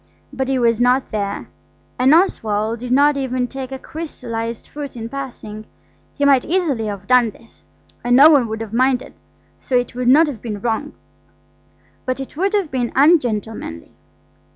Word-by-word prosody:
But 265 -1 -2
he 265 0 +1
was 235 -2 +2
not 250 +2 +2
there, 200 - -3 0.5
and 255 +2 +4
Oswald 220 - +1
did 250 +1 -6
not 285 +2 +4
even 255 -2 -1
take 265 0 -7
a 265 - -4
crystallised 235 -7 -6
fruit 285 -4 -7
in 225 0 -5
passing. 235 -5 -7 0.5
He 285 - 0
might 275 -3 +5
easily 305 -11 0
have 200 -1 -6
done 250 -1 +4
this, 230 +2 -18 0.4
and 245 0 +3
no 290 +5 +8
one 270 -6 +4
would 220 0 -5
have 225 -1 -7
minded, 255 +1 +1 0.5
so 260 - -3
it 245 -1 +1
would 250 0 -3
not 295 +6 +6
have 270 -9 -6
been 215 -4 -5
wrong. 235 +7 -2 1.1
But 255 +1 -1
it 270 - -7
would 390 +6 0
have 390 -7 0
been 245 -2 -1
ungentlemanly. 230 - +1
250 Hz, 170 wpm, -19 LUFS, 225-275 Hz, 1.1 s, no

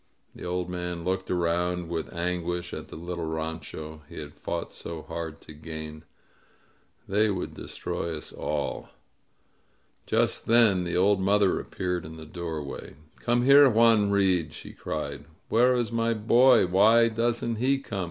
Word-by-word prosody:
The - - -11
old 90 0 -2
man 90 -1 -4
looked 95 +1 -2
around 90 0 0
with 80 -1 -4
anguish 90 0 -3
at - - -6
the - - -10
little 85 0 -5
rancho 80 -1 -5
he - - -11
had - - -7
fought - - -5
so 80 -2 -7
hard 80 -3 -6
to 75 - -11
gain. 80 0 -8 1.0
"They 105 +2 +2
would 95 -3 -3
destroy 85 -2 -4
us 75 - -8
all." 75 -2 -3 1.2
Just - - +1
then 110 -6 +4
the 85 0 -1
old 100 +2 +4
mother 100 0 +3
appeared 90 -1 -3
in 80 +1 -9
the 80 - -9
doorway. 80 -5 -6 0.2
"Come 120 0 +1
here, 140 +1 +8
Juan 115 -3 +4
Reed," 95 -6 +2
she - - -10
cried. - - -5 0.2
"Where 125 +3 +4
is 120 -2 -1
my 115 0 +1
boy? 120 +2 +5
Why 110 +6 +5
doesn't 115 0 -1
he 130 +4 +2
come? 105 -7 -6
90 Hz, 150 wpm, -27 LUFS, 85-110 Hz, 1.2 s, here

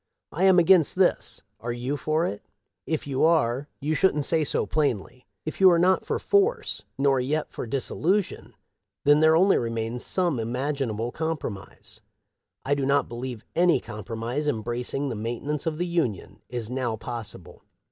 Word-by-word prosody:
I 180 +5 +1
am 190 -1 +6
against 175 -2 +5
this. 185 -1 +1 0.2
Are 120 +2 -4
you 125 +4 -2
for 155 +4 0
it? 100 - -4 0.5
If 160 -2 -1
you 135 -2 -1
are, 145 -5 +2
you 150 +2 -1
should 155 -4 +2
say 160 0 +2
so 145 - 0
plainly. 125 -4 -2 0.2
If 155 - -5
you 190 - +9
are 170 - +5
not 185 +2 +3
for - - 0
/tr^'^, 405 +4 +1 0.2
nor 135 -1 +3
yet 150 +5 -1
for - - -6
dissolution, 170 - -1 0.5
there 155 +2 +6
only 190 +4 +5
remains 115 +1 -3
some 175 -7 0
imag 125 +6 -2
inable 115 +3 -3
compromise. 160 -11 -5 0.6
I 140 - +2
do 140 -1 0
not 140 +1 +2
believe 120 -1 -6
any 175 0 +4
compromise, 115 +6 -4
embracing 125 +3 -2
the 120 - -3
maintenance 120 +8 -3
of 155 -1 -1
the 175 - -1
Union, 165 - -2
is 120 -2 -3
now 125 -2 -2
possible. 110 -6 -7
140 Hz, 160 wpm, -26 LUFS, 120-160 Hz, 0.6 s, you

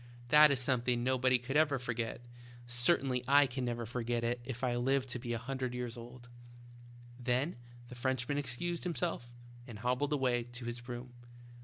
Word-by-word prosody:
That 150 +2 +8
is 140 -2 +2
something 125 -2 +1
nobody 130 0 +3
ever 145 0 +3
could 125 - -8
forget; 115 -1 -3 0.4
cer 120 +7 +3
tainly 125 -2 -2
I 145 +1 +7
can 130 0 -3
never 120 -1 -2
forget 120 0 -2
it 120 +1 0
if 125 +1 -6
I 125 -1 +1
live 130 +2 +1
to 125 -1 -4
be 120 0 -5
a 120 - 0
hundred 130 +1 -3
years 125 -1 -4
old." 120 +1 -11 0.9
Then 125 +7 0 0.3
the 125 - -10
Frenchman 130 +2 -1
excused 165 +6 -2
himself 170 -8 -2 0.4
and 115 -4 -8
hob 125 +3 0
bled 145 +1 0
away 130 -4 +2
to 120 0 -8
his 120 0 -5
room. 120 +1 -6
125 Hz, 180 wpm, -33 LUFS, 120-135 Hz, 0.9 s, That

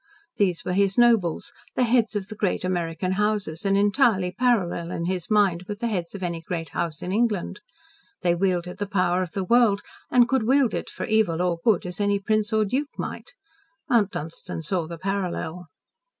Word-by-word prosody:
These 185 -5 +1
were 180 - -1
his 195 0 +2
nobles 230 -9 +3 0.2
the 255 - +2
heads 230 -3 +2
of 200 -2 -2
the 215 - -7
great 205 -3 -1
American 175 0 -1
houses, 205 -5 -1
and 195 0 +3
entirely 205 -3 +3
parallel, 190 -6 +1
in 170 -1 -3
his 180 -1 -2
mind, 195 -5 +2
with 210 - -4
the 235 +1 -2
heads 180 -3 -3
of 190 - -6
any 170 -2 -3
great 165 0 -4
house 165 -2 -3
in 180 - -3
England. 210 -3 0 0.6
They 175 -1 +3
wielded 180 -1 -1
the 205 - -2
power 185 -2 +1
of 180 -3 -4
the 195 -2 -2
world, 215 0 +3 0.3
and 245 -1 +5
could 260 -5 +1
wield 265 -3 +3
it - - -3
for - - -5
evil 215 -7 +2
or 175 -2 0
good, 215 -7 +3
as 180 +1 -6
any 205 0 +2
prince 210 +1 0
or 215 -1 +2
duke 275 +8 -1
might. - - -6 0.6
Mount 220 -5 +4
Dunstan 160 +1 -6
saw 170 0 -1
the 170 0 -7
parallel. 180 -2 -3
195 Hz, 195 wpm, -25 LUFS, 175-215 Hz, 0.6 s, and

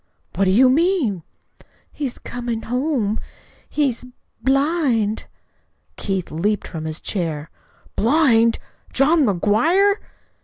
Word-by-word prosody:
"What 195 - +1
do - - +3
you 250 +7 +6
mean?" 280 - +2 0.7
"He's 275 -5 -4
coming 240 -2 -5
home. 250 -4 -1 0.5
He's 275 -6 0 0.4
blind." 270 -6 +1 0.7
Keith 190 -3 -3
leaped 205 +7 -1
from 160 -2 -6
his 155 0 -4
chair. 160 -5 -3 0.4
"BLIND? 230 -3 +3 0.3
JOHN 295 +3 +3
McGUIRE?" 305 - +3
235 Hz, 100 wpm, -21 LUFS, 205-290 Hz, 0.7 s, you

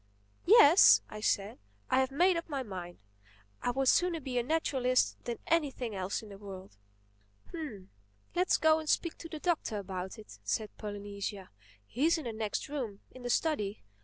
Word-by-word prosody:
"Yes," 370 -5 +8
I 215 - -7
said, 200 - 0 0.3
"I - - +4
have 260 0 +2
made 350 +7 +3
up 335 0 -4
my 275 -3 -2
mind. 180 -5 -7 0.6
I - - 0
would 265 +2 0
sooner 350 +3 +3
be 260 -4 -2
a - - 0
naturalist 255 -4 +1
than 240 -1 -3
anything 275 -8 0
else 190 +2 -3
in 215 - -11
the 200 -1 -11
world." 190 - -10 0.8
"Humph!—Let's 195 - -3
go 315 0 +4
and 310 -1 -6
speak 335 - +1
to 330 - -8
the 315 - -6
Doctor 310 -9 -1
about 190 -1 -5
it," 215 - -13
said 215 -2 -2
Polynesia. 205 -1 -6 0.3
"He's 305 - +1
in 315 - -5
the 235 -3 -4
next 215 -1 -3
room—in 255 -3 -6
the 245 - -4
study. 230 -8 0
245 Hz, 165 wpm, -31 LUFS, 200-310 Hz, 0.8 s, Yes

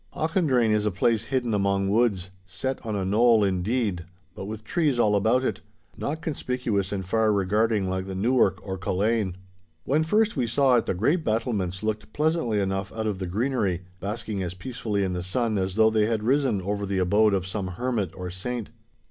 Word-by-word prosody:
Auchendrayne 150 - +2
is 105 0 +2
a - - +4
place 110 +4 +1
hidden 125 -3 -1
among 100 -1 +1
woods—set 95 +2 -1
on 110 -3 -3
a 95 -2 -1
knoll, 110 +2 +4
indeed, 100 0 0 0.3
but - - -7
with 110 +1 -6
trees 150 -2 +1
all 105 -3 +3
about 110 +6 +2
it, - - -2 0.3
not 155 +3 -4
conspicuous 125 - -2
and 95 -2 -3
far 110 +3 +2
regarding 105 +1 +1
like 95 0 -2
the 95 - -5
Newark 105 -1 +2
or 95 0 -4
Culzean. 100 +1 0 0.5
When 145 - +2
first 210 +7 +2
we 125 -5 0
saw 130 +3 +3
it 115 - -1
the - - 0
grey 115 - +2
battlements 110 - -2
looked 110 0 -3
pleasantly 150 -8 +1
enough 95 0 -2
out 110 0 -4
of 105 -3 -2
the 95 - -3
greenery, 100 -3 -1 0.2
basking 105 +1 -4
as 90 -1 -4
peacefully 105 0 -3
in 95 -1 -1
the 90 - -2
sun 110 +3 -1
as 95 0 -2
though 110 0 +5
they 110 -1 +2
had 110 -2 -1
risen 130 -5 +1
over 100 +1 -2
the 95 0 -1
abode 100 +3 +3
of 95 -2 -1
some 95 0 -3
hermit 105 +1 -2
or 90 -1 -6
saint. 115 +5 -4
105 Hz, 190 wpm, -25 LUFS, 95-120 Hz, 0.5 s, though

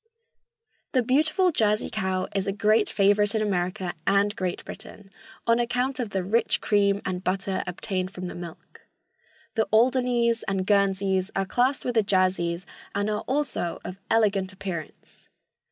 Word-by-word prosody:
The 255 -3 +3
beautiful 310 +9 +3
Jersey 215 -6 +1
cow 190 -3 -1
is 195 -1 -1
a - - +1
great 215 +1 +2
favorite 205 +1 +3
in 220 - +1
America 185 -2 -1
and 200 +1 +3
Great 185 -5 -3
Britain 200 -2 -10 0.3
on 230 0 +3
account 250 +3 0
of 240 -4 -2
the 190 -2 -2
rich 220 +6 +1
cream 200 -1 +2
and 185 -1 -3
butter 190 0 -1
obtained 185 +1 -3
from 185 -1 -7
the 180 - -5
milk. 170 -2 -10 0.7
The 220 -3 +1
Alderneys 240 0 +3
and 195 -1 -1
Guernseys 195 -1 +2
are 195 - +1
classed 250 +7 +1
with 245 - 0
the 225 - +4
Jerseys 185 -3 +1 0.3
and 205 +1 0
are 210 0 -1
also 265 - -1
of 185 +1 -7
"elegant 200 -4 +2
appearance." 185 -4 -7
200 Hz, 155 wpm, -26 LUFS, 190-230 Hz, 0.7 s, the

